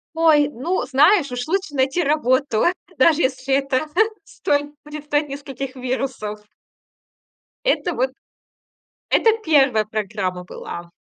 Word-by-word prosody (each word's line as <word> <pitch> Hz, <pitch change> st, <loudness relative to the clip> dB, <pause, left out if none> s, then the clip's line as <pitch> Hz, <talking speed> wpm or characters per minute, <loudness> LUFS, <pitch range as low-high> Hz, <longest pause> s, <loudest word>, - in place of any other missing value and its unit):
Ой, 310 Hz, -3 st, +4 dB
ну, 330 Hz, +9 st, -2 dB
знаешь, 285 Hz, +3 st, +4 dB
уж 245 Hz, 0 st, -4 dB
лучше 380 Hz, -2 st, -1 dB
найти 270 Hz, +5 st, +1 dB
работу, 270 Hz, -5 st, +1 dB, 0.3 s
даже 325 Hz, 0 st, +4 dB
если 265 Hz, 0 st, 0 dB
это 275 Hz, +1 st, 0 dB, 0.4 s
стоит 290 Hz, -1 st, -1 dB
предстоит 295 Hz, 0 st, -2 dB
нескольких 275 Hz, -1 st, -6 dB
вирусов. 250 Hz, -5 st, -3 dB, 1.2 s
Это 360 Hz, -7 st, +1 dB
вот 260 Hz, -1 st, 0 dB, 1.0 s
это 450 Hz, -, +5 dB
1 270 Hz, -8 st, +4 dB
программа 200 Hz, -4 st, -3 dB
была. 170 Hz, -1 st, -8 dB
275 Hz, 110 wpm, -21 LUFS, 250-300 Hz, 1.2 s, это